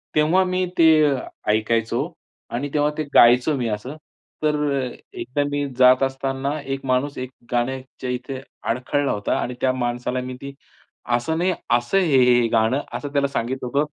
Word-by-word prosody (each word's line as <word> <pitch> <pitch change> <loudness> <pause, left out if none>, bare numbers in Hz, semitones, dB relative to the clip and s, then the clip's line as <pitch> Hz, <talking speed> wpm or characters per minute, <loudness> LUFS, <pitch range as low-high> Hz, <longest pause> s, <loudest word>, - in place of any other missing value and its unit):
तेव्हा 160 +5 +4
मी 185 0 0
ते 165 -1 +6 0.6
ऐकायचो 110 +1 0 0.4
आणि 140 +4 -3
तेव्हा 150 0 +2
ते 155 - 0
गायचो 125 +5 +6
मी 120 -2 -1
असं. 110 +8 -4 0.5
तर 150 0 +2 0.3
अ, 125 -1 -3 0.2
एकदा 345 - -2
मी 145 0 -1
जात 130 +1 +6
असताना, 135 +2 -2
एक 135 0 -5
माणूस 130 +3 0
एक 130 0 -4 0.2
गाण्याच्या 130 +1 -3
इथे 125 +2 -4 0.3
अडखळला 130 +4 0
होता 105 0 -1
आणि 125 - -3
त्या 130 - +3
माणसाला 125 0 -2
मी 130 0 -6
ती, 140 0 -7 0.6
"असं 160 +7 -2
नाही, 180 +2 +2 0.3
असं 120 +11 -1
आहे 185 -3 +3
हे, 135 -3 +4 0.2
हे 115 - +2
गाणं" 115 +5 +2
असं 145 -1 -5
त्याला 140 -1 +2
सांगितलं 130 -1 -3
होतं. 140 +4 +1
135 Hz, 165 wpm, -22 LUFS, 125-145 Hz, 0.6 s, ते